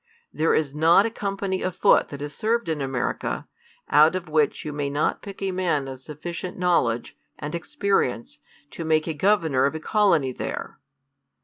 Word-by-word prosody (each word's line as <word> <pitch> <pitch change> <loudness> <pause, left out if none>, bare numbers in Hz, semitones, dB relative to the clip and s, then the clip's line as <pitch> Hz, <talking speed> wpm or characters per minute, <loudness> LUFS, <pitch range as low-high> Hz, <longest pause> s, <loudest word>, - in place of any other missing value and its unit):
There 160 +1 +2
is 145 -3 0
not 165 +6 +5
a 230 - -1
com 200 -3 -3
pany 190 -1 -2
of 185 -1 -2
foot - - +4
that 140 -1 -8
has 145 0 -5
served 230 +4 0
in 155 -2 -1
America, 135 -2 -2 0.4
out 155 +4 +5
of 180 -1 -4
which 155 -1 +1
you 150 - -4
may 145 -1 -2
not 145 +2 0
pick 200 -1 -8
a 195 - 0
man 175 -7 0
of 130 -1 -7
sufficient 165 +6 -6
knowledge 170 -11 +1 0.2
and 150 +1 -6
experience, 170 -7 -1 0.3
to 165 - -6
make 155 -1 +2
a 160 - -2
governor 160 -6 +2
of 140 - -4
a - - -3
colony 165 -7 +2
there. - - -6
160 Hz, 185 wpm, -24 LUFS, 145-185 Hz, 0.4 s, not